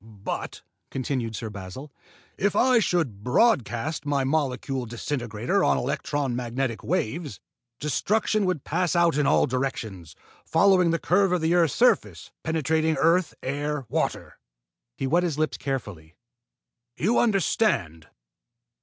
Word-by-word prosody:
"But," 105 -3 -6 0.3
continued 125 -4 -3
Sir 110 -1 -5
Basil, 100 +9 -8 0.4
"if 205 +1 0
I 255 -2 +4
should 155 - -1
broadcast 140 - +1
my 145 -2 0
molecule 135 -2 -1
disintegrator 120 -1 -2
on 70 -1 +3
electron 135 - -2
magnetic 120 0 -3
waves, 150 - -2 0.4
destruction 205 +7 0
would 180 -7 -1
pass 175 +1 0
out 170 -2 +3
in 150 -1 +2
all - - +4
directions, 110 - -4 0.3
following 180 +1 +4
the 165 - +2
curve 190 +3 +2
of 180 -2 +1
the 160 +2 +2
earth's 170 -4 +3
surface, 250 +1 +2
penetrating 160 0 0
earth, 170 +1 +2
air, 145 +1 -2
water." - - -2 0.6
He - - -2
wet 165 +7 +3
his 170 -5 -1
lips 155 -1 -1
carefully. 105 - -5 0.8
"You 205 - +2
understand?" 195 - +1
145 Hz, 130 wpm, -25 LUFS, 120-170 Hz, 0.8 s, I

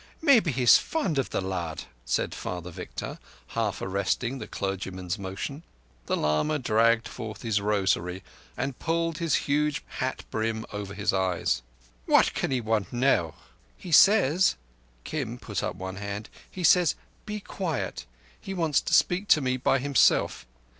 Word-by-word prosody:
Maybe 270 - +5
he's 125 -2 +6
fond 195 - -1
of 135 - -1
the - - -1
lad," 90 -4 -4 0.2
said - - 0
Father 90 0 -5
Victor, - - -7 0.3
half 110 -3 -2
arresting 100 +7 -1
the - - -7
clergyman's 95 -1 -4
motion. 100 +10 -5 0.5
The - - +1
lama 75 - +1
dragged 115 -2 +2
forth 110 -3 -7
his 110 -3 +1
rosary 95 -3 0 0.3
and 135 +1 -3
pulled 165 0 -1
his 165 -2 +1
huge 150 +1 +1 0.2
hat 130 +1 -2
brim 110 0 -2
over 100 -1 -5
his 105 -1 0
eyes. 90 -9 0 0.5
"What - - +5
can - - -1
he 130 -2 0
want 110 -4 -1
now?" 120 - +2 0.4
"He 180 - -9
says"—Kim 125 - +2
put 105 -5 -4
up - - -3
one 95 +1 -6
hand. 100 +1 -5 0.2
"He 185 - -7
says: 175 0 +5 0.3
'Be 210 0 -3
quiet.' 175 - -4 0.3
He 195 - -6
wants 165 -5 +2
to - - +1
speak 185 +4 +2
to 155 - +6
me 130 -2 0
by 130 +1 +2
himself. 130 - +2
115 Hz, 150 wpm, -27 LUFS, 95-150 Hz, 0.5 s, he's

